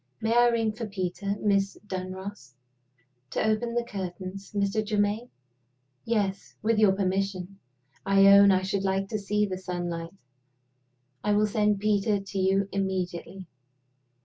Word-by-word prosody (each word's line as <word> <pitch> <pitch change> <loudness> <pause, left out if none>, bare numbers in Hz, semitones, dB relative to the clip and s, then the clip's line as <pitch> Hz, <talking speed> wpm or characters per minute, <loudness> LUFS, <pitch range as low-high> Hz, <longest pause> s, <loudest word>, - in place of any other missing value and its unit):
"May 225 +1 0
I 240 0 +6
ring 230 -2 +1
for 220 +1 -6
Peter, 195 0 -3
Miss 200 -1 +1
Dunross?" 185 -7 -6 0.7
"To - - -1
open 235 +2 0
the 240 - +1
curtains, 190 -2 -6
Mr. 200 +1 0
Germaine?" 210 +2 0 0.8
"Yes 205 -4 -1
with 220 0 +2
your 210 -3 +5
permission. 195 0 -2 0.4
I 195 0 +4
own 200 0 +8
I 185 -1 +3
should 195 0 -1
like 195 0 0
to 215 - -2
see 210 +1 0
the 185 -2 -4
sunlight." 175 -1 -4 1.1
"I 210 - +2
will 210 +1 +3
send 210 -1 +1
Peter 205 0 +2
to 195 0 -5
you 195 +1 +2
immediately." 190 -1 -3
200 Hz, 140 wpm, -27 LUFS, 190-210 Hz, 1.1 s, own